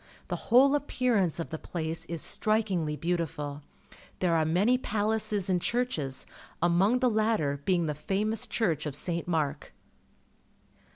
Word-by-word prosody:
The -, -, -1 dB
whole 265 Hz, +4 st, +6 dB
appearance 250 Hz, -, +1 dB
of 165 Hz, -, -4 dB
the 160 Hz, -, -4 dB
place 160 Hz, -1 st, -4 dB
is 170 Hz, -2 st, -4 dB
strikingly 195 Hz, -8 st, 0 dB
beautiful. 155 Hz, -3 st, -3 dB, 0.6 s
There 175 Hz, -2 st, +1 dB
are 160 Hz, -1 st, +2 dB
many 190 Hz, +10 st, +3 dB
palaces 215 Hz, -3 st, -1 dB
and 180 Hz, -2 st, +1 dB
churches, 165 Hz, -, -2 dB, 0.3 s
among 190 Hz, +8 st, +3 dB
the 255 Hz, -, +4 dB
latter 215 Hz, -11 st, +1 dB
being 180 Hz, -3 st, +2 dB
the 150 Hz, -, -1 dB
famous 205 Hz, +8 st, -1 dB
church 165 Hz, -9 st, 0 dB
of 140 Hz, -, -3 dB
St. 170 Hz, +2 st, -2 dB
Mark. 150 Hz, -4 st, -2 dB
175 Hz, 135 wpm, -29 LUFS, 160-220 Hz, 0.6 s, whole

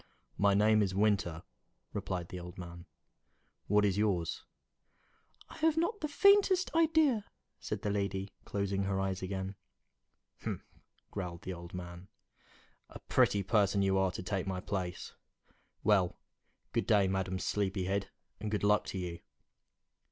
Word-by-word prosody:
"My 100 Hz, -1 st, +4 dB
name 110 Hz, +1 st, +5 dB
is 95 Hz, -2 st, 0 dB
Winter," 100 Hz, -5 st, +1 dB, 0.5 s
replied 90 Hz, -2 st, -3 dB
the 90 Hz, -, -6 dB
old 90 Hz, 0 st, -9 dB
man. 85 Hz, -1 st, -9 dB, 0.8 s
"What 105 Hz, +1 st, +4 dB
is 100 Hz, 0 st, +1 dB
yours?" 95 Hz, -6 st, 0 dB, 1.0 s
"I -, -, -12 dB
have 320 Hz, 0 st, +2 dB
not 345 Hz, +6 st, 0 dB
the 305 Hz, -, 0 dB
faintest 390 Hz, +3 st, +4 dB
idea," 315 Hz, -8 st, +4 dB, 0.4 s
said -, -, -4 dB
the 105 Hz, -, 0 dB
lady, 100 Hz, -1 st, -2 dB
closing 100 Hz, -1 st, -1 dB
her 95 Hz, 0 st, 0 dB
eyes 95 Hz, -1 st, -1 dB
again. 95 Hz, 0 st, -3 dB, 0.9 s
"Humph!" -, -, -4 dB, 0.5 s
growled 90 Hz, -4 st, -5 dB
the 95 Hz, -, -4 dB
old 85 Hz, 0 st, -9 dB
man, 90 Hz, +1 st, -7 dB, 0.8 s
"a -, -, -9 dB
pretty 100 Hz, -1 st, +3 dB
person 100 Hz, -1 st, +3 dB
you 95 Hz, 0 st, +2 dB
are 95 Hz, 0 st, +3 dB
to -, -, -5 dB
take 95 Hz, 0 st, -2 dB
my 95 Hz, -1 st, -2 dB
place! 90 Hz, -1 st, -4 dB, 0.7 s
Well, 95 Hz, -4 st, +3 dB, 0.6 s
good -, -, 0 dB
day, 100 Hz, -3 st, +5 dB
Madam 95 Hz, 0 st, -1 dB
Sleepyhead, 95 Hz, 0 st, -1 dB, 0.3 s
and 105 Hz, +1 st, -3 dB
good 105 Hz, -1 st, -1 dB
luck 105 Hz, +1 st, +4 dB
to -, -, -5 dB
you!" 90 Hz, -2 st, -4 dB
100 Hz, 145 wpm, -33 LUFS, 90-105 Hz, 1.0 s, name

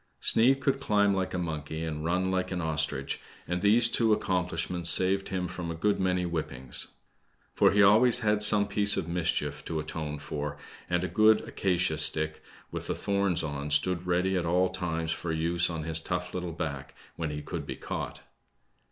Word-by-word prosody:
Sneid 135 Hz, +4 st, +4 dB
could 135 Hz, 0 st, 0 dB
climb 105 Hz, -6 st, +2 dB
like 95 Hz, -1 st, -2 dB
a -, -, -1 dB
monkey, 80 Hz, -2 st, -4 dB
and 75 Hz, -1 st, -4 dB
run 90 Hz, +3 st, 0 dB
like 95 Hz, 0 st, -2 dB
an 90 Hz, -, -2 dB
ostrich, 75 Hz, -4 st, -2 dB, 0.3 s
and 90 Hz, +1 st, -2 dB
these 110 Hz, +4 st, +4 dB
two 115 Hz, -2 st, +1 dB
accomplishments 90 Hz, -4 st, -1 dB
saved 95 Hz, +3 st, +2 dB
him 90 Hz, -1 st, -2 dB
from 90 Hz, -1 st, -6 dB
a 85 Hz, -, -4 dB
good 105 Hz, +5 st, 0 dB
many 90 Hz, -1 st, 0 dB
whippings. 70 Hz, -7 st, +2 dB, 0.7 s
For -, -, +4 dB
he 100 Hz, 0 st, +4 dB
always 115 Hz, +5 st, +5 dB
had 105 Hz, -1 st, +1 dB
some 105 Hz, -1 st, +6 dB
piece 100 Hz, 0 st, +2 dB
of -, -, -3 dB
mischief 85 Hz, 0 st, -2 dB
to 80 Hz, -2 st, -3 dB
atone 75 Hz, -1 st, -5 dB
for, 75 Hz, 0 st, -5 dB, 0.3 s
and 90 Hz, 0 st, 0 dB
a -, -, -1 dB
good 110 Hz, +1 st, +4 dB
acacia 90 Hz, -4 st, -1 dB
stick, 80 Hz, +1 st, +3 dB, 0.3 s
with -, -, -6 dB
the -, -, -2 dB
thorns 100 Hz, -4 st, 0 dB
on, 75 Hz, -1 st, -4 dB
stood 90 Hz, +5 st, +1 dB
ready 90 Hz, +2 st, +1 dB
at 90 Hz, -, 0 dB
all 90 Hz, +2 st, +2 dB
times 85 Hz, -3 st, -3 dB
for 85 Hz, -, -4 dB
use 85 Hz, +2 st, +1 dB
on 80 Hz, -2 st, -4 dB
his 80 Hz, 0 st, +2 dB
tough 90 Hz, +1 st, -4 dB
little 90 Hz, -2 st, -4 dB
back, 70 Hz, -5 st, -6 dB, 0.2 s
when 80 Hz, -2 st, -3 dB
he 75 Hz, 0 st, -6 dB
could -, -, -6 dB
be -, -, -5 dB
caught. -, -, -6 dB
90 Hz, 185 wpm, -28 LUFS, 80-95 Hz, 0.7 s, some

